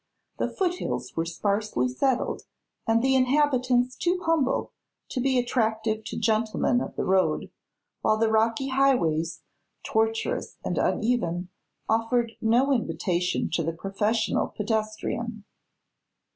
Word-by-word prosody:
The - - 0
foothills 360 -2 -2
were 165 - 0
sparsely 200 - 0
settled 250 - 0 0.5
and 225 +1 +3
the 265 0 +3
inhabitants 255 -2 +2
too 355 +5 0
humble 320 -5 +1 0.4
to 255 - -2
be 265 0 +2
attractive 220 -3 0
to - - -5
gentlemen 220 +2 +1
of - - -5
the - - -2
road, 190 0 +1 0.5
while 215 0 +3
the 220 0 +2
rocky 225 +4 +2
highways, 170 - +1 0.4
tortuous 225 0 -1
and - - -1
uneven, 180 -7 0 0.4
offered 230 +1 +1
no 240 +5 +3
invitation 180 -7 0
to - - +1
the 165 +1 -2
professional 205 +5 0
pedestrian. 215 +1 -3
225 Hz, 115 wpm, -26 LUFS, 210-255 Hz, 0.5 s, and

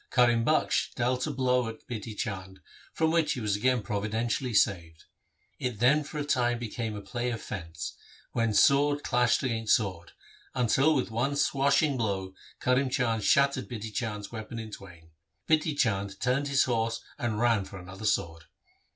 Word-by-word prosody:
Karim 120 -2 +4
Bakhsh 155 +6 +1
dealt 125 +3 0
a - - -1
blow 125 -3 +1
at 115 - -8
Bidhi 110 -3 -6
Chand 95 -2 -5 0.3
from 160 -1 +1
which 160 -2 +2
he - - -5
was 105 -3 0
again 125 +2 +1
providentially 115 +6 -1
saved. 85 -6 +1 0.6
It 125 -4 -2
then 140 +6 +4
for 150 - -8
a 145 - -2
time 120 -4 +1
became 115 -1 -4
a 100 - -7
play 120 0 -3
of 115 -2 -3
fence, 80 -6 -6 0.4
when 115 -1 +1
sword 145 +4 +4
clashed 125 -1 +2
against 115 -4 +2
sword, 90 -6 -4 0.4
until 135 +5 +3
with 125 -4 -1
one 125 +6 0
swashing 140 0 +2
blow 95 -5 -2 0.3
Karim 130 +1 +2
Bakhsh 115 -3 0
shattered 140 +3 +2
Bidhi 110 -3 -6
Chand's 105 -3 -4
weapon 110 0 -7
in 110 -1 -6
twain. 85 -5 -12 0.4
Bidhi 155 -1 +2
Chand 100 -5 0
turned 130 +3 +1
his 140 -1 +3
horse 115 -2 -1 0.2
and 115 -5 -1
ran 115 -4 +3
for 100 - -10
another 95 +3 -9
sword. 85 -5 -1
115 Hz, 170 wpm, -28 LUFS, 105-130 Hz, 0.6 s, Karim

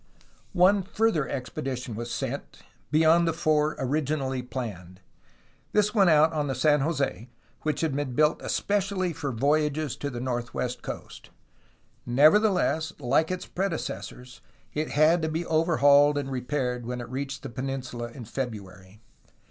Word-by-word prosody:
One 195 +3 +5
further 190 -5 0
expedition 125 -2 -4
was 120 +2 -5
sent, - - -5 0.3
beyond 160 +3 +4
the 165 - +1
four 155 -1 +1
origi 145 +3 -1
nally 130 -2 -2
planned. 105 -8 -7 0.7
This 210 0 +2
went 195 -5 +5
out 155 +1 +5
on 150 -2 -1
the 135 - -2
San 150 +3 +3
Jose, 135 - -2 0.3
which 155 -1 -1
had 160 -4 0
been 140 -4 -3
built 150 +2 +3
especially 195 -3 -1
for 145 -3 -4
voyages 150 +3 0
to 145 - -3
the 120 -3 -6
northwest 120 0 -3
coast. - - -8 0.7
Nevertheless, 160 - +3
like 150 +4 +1
its 185 0 -3
predecessors, 130 -9 -5 0.3
it 155 +1 -2
had 155 +4 +4
to 160 - -1
be 160 +2 -2
overhauled 145 -3 +4
and 140 -1 -3
repaired 125 -1 -2
when 125 0 -3
it 120 - -6
reached 135 +2 -5
the 135 - -5
peninsula 130 -1 -4
in 120 0 -10
February. 105 -5 -7
145 Hz, 145 wpm, -27 LUFS, 125-160 Hz, 0.7 s, One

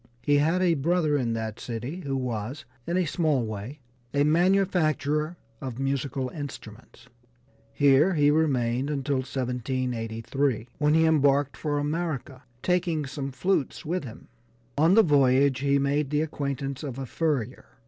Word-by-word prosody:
He 145 -1 +3
had 165 +6 +2
a 175 -2 +4
brother 160 +1 +1
in 120 -5 0
that 110 -1 -4
city 125 +8 -5
who 140 -6 -3
was, 125 +3 -4 0.2
in 175 - 0
a 185 - +2
small 155 -6 +1
way, 110 +7 -7 0.3
a 140 - +4
manufacturer 160 -2 +2 0.2
of 130 -4 -5
musical 135 0 -2
instruments. 125 -5 -9 0.7
Here 145 +6 +4
he 145 -1 +4
remained 135 -4 +1
until 140 -1 -1
1783, 125 -1 -2
when 150 +1 +3
he 160 0 +4
embarked 145 -3 +3
for 150 -2 -2
America, 145 -3 -3 0.2
taking 175 -4 0
some 140 0 -5
flutes 135 +2 -1
with 175 +2 -2
him. 120 -3 -10 0.5
On 160 +6 +4
the 225 - +7
voyage 140 -4 +3
he 140 0 +2
made 140 +1 0
the 150 +1 +1
acquaintance 140 -3 -4
of 135 -5 -5
a 135 - -4
furrier. 130 -4 -2
140 Hz, 145 wpm, -26 LUFS, 130-155 Hz, 0.7 s, the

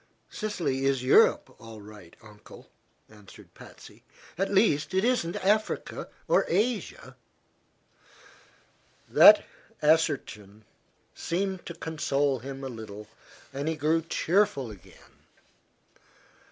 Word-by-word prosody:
"Sicily 160 - -3
is 135 -2 0
Europe, 130 - +3
all 115 -1 -12
right, 105 -5 -14
Uncle," 105 -1 -16 0.4
answered 105 -3 -17
Patsy. - - -15 0.3
"At 195 +4 -2
least, 190 -4 +1
it 190 +3 +2
isn't 240 -9 0
Asia 215 +2 -1 0.2
or - - +3
Africa." 210 +3 -2 1.9
That - - +7 0.3
assertion 110 -9 -1 0.5
seemed 190 +1 -4
to 170 - -7
console 145 -4 -1
him 135 +2 -8
a - - -4
little, 105 -3 -10 0.4
and 140 +3 -4
he 160 - -1
grew 155 +2 +1
cheerful 165 - 0
again. 95 -2 -18
145 Hz, 100 wpm, -27 LUFS, 110-185 Hz, 1.9 s, That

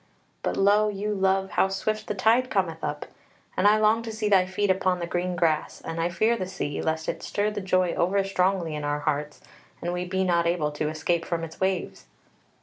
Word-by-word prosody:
But - - -2
lo 205 +2 +4
you 210 +1 -2
love, 190 -1 +1
how - - +3
swift 215 +3 -2
the 210 - -2
tide 230 +6 +3
cometh 170 -5 -1
up, 145 - -3 0.5
and 185 - +3
I 210 +1 +6
long 215 +1 +3
to 230 -1 -6
see 220 -1 -2
thy 190 -2 +4
feet 190 +1 +1
on 185 -1 +2
the 175 - -3
green 180 +1 -2
grass, 160 -3 0
and 165 0 -4
I 170 - +1
fear 220 +6 +2
the 185 -5 -4
sea, 180 -6 -4
lest 160 0 -2
it - - -3
stir 210 +1 -1
the 210 -1 -4
joy 185 -2 +1
over 195 +3 +1
strongly 185 -3 0
in 150 -1 -4
our 145 0 -1
hearts 150 0 -2 0.4
and 175 +1 -3
we 180 0 -2
be 190 +1 -1
not 170 -2 +2
able 165 -3 0
to 150 +1 -2
escape 160 +2 -1
from 165 -1 -3
its 160 -1 -8
waves." 190 -1 -1
185 Hz, 220 wpm, -26 LUFS, 165-200 Hz, 0.5 s, I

